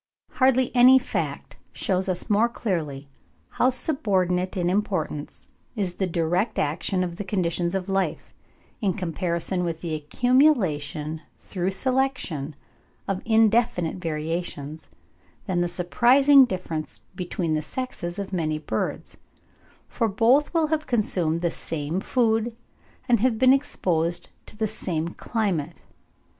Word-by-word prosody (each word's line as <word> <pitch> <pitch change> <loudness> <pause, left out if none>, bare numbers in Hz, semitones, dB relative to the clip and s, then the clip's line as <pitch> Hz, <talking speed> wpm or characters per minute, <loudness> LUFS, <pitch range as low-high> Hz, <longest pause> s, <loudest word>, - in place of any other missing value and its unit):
Hardly 260 -1 +2
any 250 +2 +8
fact 255 - -3
shews 190 0 -1
us 180 -1 -1
more 215 +3 +3
clearly 155 - -3 0.4
how 250 - +2
subordinate 190 - 0
in 175 -1 0
importance 180 -6 -2 0.3
is 195 -5 -1
the 190 +1 -1
direct 175 +5 0
action 170 +5 0
of 175 -1 -5
the 205 - -3
conditions 175 -2 -1
of 190 -1 -2
life, 195 -1 -2 0.5
in 195 -4 +1
comparison 175 +1 -2
with 165 -2 -3
the 170 -2 -3
accumulation 155 - +1 0.2
through 185 -1 -3
selection 195 - -1 0.5
of 195 -1 -2
indefinite 225 -5 +2
variations, 160 -2 -4 0.6
than 180 -3 0
the 175 - +1
surprising 255 +11 +5
difference 170 -7 -5
between 180 -3 -2
the 155 - 0
sexes 180 - -5
of 200 -1 -5
many 155 -4 0
birds; 155 - -4 0.7
for 230 - 0
both 235 +8 +3
will 325 -3 +1
have 310 -1 -1
consumed 180 -9 0
the 170 -1 0
same 160 +2 -3
food, 225 +1 +1 0.5
and 235 -2 +4
have 240 0 +2
been 255 +2 +6
exposed 175 - -1 0.2
to 210 - -14
the 220 - 0
same 170 -6 -3
climate. 175 -7 -3
185 Hz, 125 wpm, -25 LUFS, 165-235 Hz, 0.7 s, any